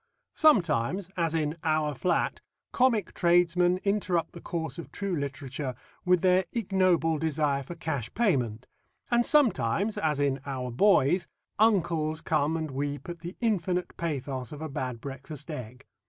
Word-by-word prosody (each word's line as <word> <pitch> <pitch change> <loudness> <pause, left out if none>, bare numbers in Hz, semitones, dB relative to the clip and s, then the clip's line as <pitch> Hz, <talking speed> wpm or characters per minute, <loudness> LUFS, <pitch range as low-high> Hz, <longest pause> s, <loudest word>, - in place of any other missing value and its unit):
Sometimes, 185 - +2
as 165 -2 0
in 155 0 -1
Our 155 -2 +1
Flat, 175 +6 0 0.3
comic 240 -7 +2
tradesmen 175 +1 +3
interrupt 190 -4 0
the 170 - -11
course 160 -4 -4
of 170 - -8
true 200 -3 -2
literature 140 -2 -4 0.3
with 180 -1 +4
their 185 0 +4
ignoble 185 -7 +2
desire 150 -3 0
for 155 +6 -8
cash 145 -8 -3
payment, 125 - +1 0.5
and 240 0 +4
sometimes, 215 - +2
as 150 -3 0
in 140 -1 +1
Our 130 -3 -4
Boys, 175 - +3 0.3
uncles 165 -7 +2
come 155 0 +1
and 160 -2 -4
weep 145 +4 -4
at 170 -1 -6
the 175 +3 -7
infinite 180 -5 0
pathos 135 -6 -3
of 150 - -8
a 160 0 -5
bad 125 -4 -4
breakfast 140 +3 -7
egg. 125 -2 -8
160 Hz, 145 wpm, -28 LUFS, 140-180 Hz, 0.5 s, with